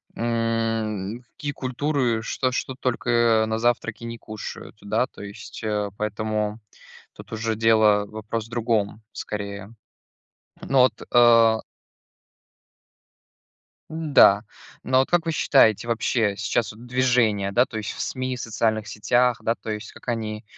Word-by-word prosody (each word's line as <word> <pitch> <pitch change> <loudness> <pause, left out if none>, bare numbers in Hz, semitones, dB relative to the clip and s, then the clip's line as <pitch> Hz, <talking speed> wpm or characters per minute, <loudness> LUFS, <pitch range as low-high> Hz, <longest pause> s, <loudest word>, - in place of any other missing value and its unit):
м, 115 -2 -1
какие 145 - -4
культуры, 130 -3 -1
что 130 +2 -1
что 130 +1 -3
только 120 -3 +2
на 110 0 -1
завтраки 120 -1 0
не 115 0 -6
кушают, 110 -1 -8
да? 110 +4 0
То - - -14
есть, 100 +3 -9
а, 105 -1 -1
поэтому 105 0 -2 0.6
тут - - -13
уже 110 0 -1
дело, 110 -2 +4
вопрос 110 +1 -5
в - - -21
другом, 115 -3 -1
скорее. 100 0 -6 0.9
Ну 135 - +1
вот, 130 0 +5 0.2
а 115 -2 +6 2.3
Н-да. 145 -10 +5 0.4
Но 130 +2 +2
вот 130 - +2
как 175 -1 +3
вы 165 - -1
считаете, 120 -7 +3
вообще 115 -3 +1
сейчас 105 +3 -1
вот 115 +3 -13
движение 120 -6 +2
да 120 +4 +4
то 110 - -6
есть 105 - -4
в - - -10
СМИ, 130 -1 -3
социальных 110 -2 -1
сетях, 120 +3 +1
да, 115 - +1
то 110 - -8
есть 105 -1 -5
как - - -16
они 110 -1 -3
115 Hz, 135 wpm, -24 LUFS, 105-120 Hz, 2.3 s, а